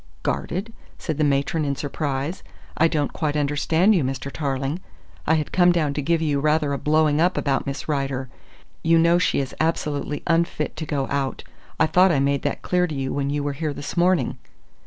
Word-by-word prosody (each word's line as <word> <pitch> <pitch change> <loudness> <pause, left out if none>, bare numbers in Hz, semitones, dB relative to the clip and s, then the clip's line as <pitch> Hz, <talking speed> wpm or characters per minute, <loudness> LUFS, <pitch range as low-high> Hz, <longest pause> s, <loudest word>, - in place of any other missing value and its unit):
"Guarded?" 200 +6 -2 0.2
said 155 -3 -4
the - - +3
matron 145 +2 +1
in 140 -1 -1
surprise. 145 +3 -3 0.3
"I 165 - +4
don't 150 -3 -1
quite 150 -2 -1
understand 150 +7 +2
you, 175 -7 +2
Mr. 135 +1 -3
Tarling. 140 +2 -2 0.5
I 160 - +4
had 155 -2 -2
come 175 -1 +5
down 155 -5 +1
to 145 - -2
give 165 +2 +1
you 145 -3 +1
rather 150 0 +1
a 140 - -2
blowing 155 0 +2
up 180 +2 +2
about 135 -1 0
Miss 140 - -4
Rider. 135 -3 -1 0.6
You 165 0 +4
know 170 +1 +4
she - - +1
is 135 -2 -3
absolutely 150 -2 -1
unfit 165 -2 0
to 155 - -5
go 140 -3 -1
out. 140 -1 -2 0.4
I - - +5
thought 180 +3 +4
I 145 - +2
made 140 0 +1
that - - -3
clear 180 0 +1
to 155 - -5
you 135 -1 -2
when 140 -1 -1
you 145 0 -1
were 145 0 -1
here 150 0 -3
this 145 - -6
morning?" 180 0 +2
150 Hz, 200 wpm, -23 LUFS, 140-165 Hz, 0.6 s, come